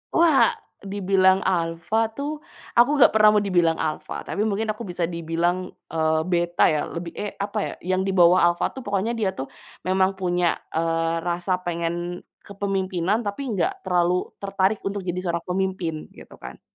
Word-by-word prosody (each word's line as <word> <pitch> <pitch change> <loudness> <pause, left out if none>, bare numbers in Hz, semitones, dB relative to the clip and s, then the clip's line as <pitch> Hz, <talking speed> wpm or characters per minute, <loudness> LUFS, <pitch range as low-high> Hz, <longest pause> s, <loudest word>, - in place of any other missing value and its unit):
Wah! 325 -5 +5 0.2
Dibilang 195 -1 +2
alfa 175 +4 0
tuh 290 +3 -4 0.4
aku 240 +3 +6
nggak - - +9
pernah 215 -1 +5
mau 210 - +4
dibilang 175 -5 +2
alfa, 155 -1 -3
tapi 210 +2 -2
mungkin 215 +1 -1
aku 215 +1 -3
bisa 175 -1 -3
dibilang, 170 +2 -1 0.2
eee, 160 -1 +1
beta 175 0 +3
ya, 150 -2 0
lebih, 170 0 -6
e 205 0 -4
apa 200 +2 -4
ya, - - -5
yang 185 +2 0
di 195 - -1
bawah 175 0 +6
alfa 175 0 +1
tuh. 265 - -10
Pokoknya 205 +4 -1
dia 195 -4 0
tuh 130 - -6 0.3
memang 190 +1 +2
punya, 180 -2 +1 0.2
eee, 165 0 0
rasa 175 +1 0
pengen 175 +1 -3 0.2
kepemimpinan, 195 +1 -1
tapi 205 +6 -3 0.2
nggak 385 +1 -1
terlalu 180 0 +1
tertarik 195 +1 0
untuk 200 0 -2
jadi 180 -1 -4
seorang 170 -2 -2
pemimpin, 185 -3 -1 0.2
gitu - - -14
kan. - - -10
185 Hz, 165 wpm, -24 LUFS, 170-200 Hz, 0.4 s, nggak